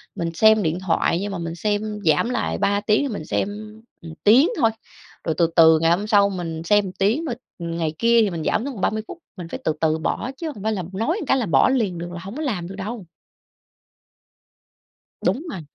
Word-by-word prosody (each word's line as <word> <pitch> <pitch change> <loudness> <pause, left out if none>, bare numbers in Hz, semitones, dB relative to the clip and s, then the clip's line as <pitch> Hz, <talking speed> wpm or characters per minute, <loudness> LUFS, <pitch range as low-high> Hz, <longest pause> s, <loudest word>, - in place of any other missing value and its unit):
mình 170 -3 -3
xem 220 +4 +5
điện 165 +1 -1
thoại 170 -2 +1
nhưng 205 - -3
mà 195 - -4
mình 165 -1 -5
xem 210 +2 -2
giảm 155 +8 +3
lại, 80 - -1
3 200 0 +1
tiếng 210 +1 +2
thì 285 - -1
mình 155 -6 -6
xem 195 - -1 0.5
một 165 -1 -9
tiếng 255 - +6
thôi, 225 - +4 0.5
rồi 160 -2 -1
từ 170 - +4
từ 160 -1 +7
ngày 165 +1 +3
hôm 200 +5 +1
sau 200 -2 +4
mình 165 -4 -5
xem 205 +3 +3
một 185 - -5
tiếng, 210 - +1 0.3
ừm, 170 -1 -4
ngày 160 -2 -1
kia 235 0 +4
thì 205 - +1
mình 165 -3 -4
giảm 215 - 0
xuống 280 - -4
còn 200 - -8
30 215 +3 0
phút, - - -8 0.2
mình 175 -2 -7
phải - - -6
từ 155 - +1
từ 160 -1 +2
bỏ, 235 +9 -2
chứ 330 - -4
hông 205 - -10
phải 220 0 0
là 185 -3 -3
nói 230 - -1
một - - -5
cái 270 - +3
là 240 - 0
bỏ 145 - +4
liền 220 -9 0
được, 175 +1 -6
là 175 - -6
hổng 200 +6 -8
có - - -4
làm 205 - -2
được 190 - -8
đâu. 205 +1 -6 2.2
Đúng 305 +7 0
rồi. 185 - -6
195 Hz, 235 wpm, -22 LUFS, 165-220 Hz, 2.2 s, từ